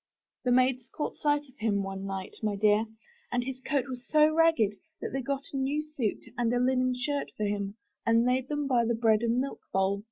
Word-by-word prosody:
The 250 - +3
maids 255 0 +3
caught 300 - -4
sight 290 -1 +2
of 260 - -22
him 205 -2 +1
one 195 0 -5
night, 195 -1 -5
my 210 -2 0
dear, 210 +2 +3 0.4
and 245 - +1
his 260 0 -5
coat 275 -2 0
was 250 -2 -7
so 305 0 +5
ragged, 320 -11 +4 0.3
that - - -4
they 270 - -2
got 275 +1 -2
a - - -1
new 280 +3 0
suit, 290 -8 -3 0.2
and 235 -1 +2
a 245 - +2
linen 255 0 +2
shirt 280 +3 -2
for 215 - -2
him, 200 0 -2 0.3
and 230 +1 +4
laid 255 +1 +1
them 295 -1 -1
by 250 -4 +3
the 235 0 +1
bread 220 -1 +3
and 235 0 +1
milk 270 +2 -2
bowl. 195 +1 +1
245 Hz, 220 wpm, -29 LUFS, 215-270 Hz, 0.4 s, so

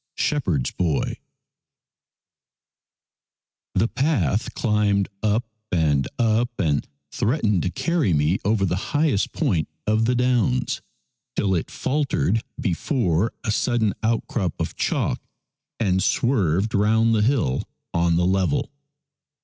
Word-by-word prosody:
SHEPHERD'S 90 - 0
BOY 80 -5 -1 2.6
THE 105 +5 +3
path 125 - 0
climbed 105 -3 +1
up 110 +3 +1 0.3
and 75 -6 +2
up 115 0 +2
and 75 -6 +1 0.2
threatened 105 - +1
to 90 - -1
carry 160 - 0
me 75 +4 +2
over 100 -1 +2
the 90 - 0 0.2
highest 145 -9 +2
point 80 -5 0 0.2
of 110 +1 +2
the 125 +2 +2
downs 120 - +1 0.5
till 95 -2 +1
it 85 - -1
faltered 130 -6 0 0.2
before 110 - 0
a 110 - 0
sudden 110 -2 +1
outcrop 110 -5 -1
of - - -3
chalk - - -1 0.6
and 95 -4 +2
swerved 105 - +1
round 110 +3 +3
the 110 - +3
hill 110 - +1 0.2
on 85 0 +2
the 90 +1 +2
level. 95 +11 +1
105 Hz, 115 wpm, -23 LUFS, 90-120 Hz, 2.6 s, THE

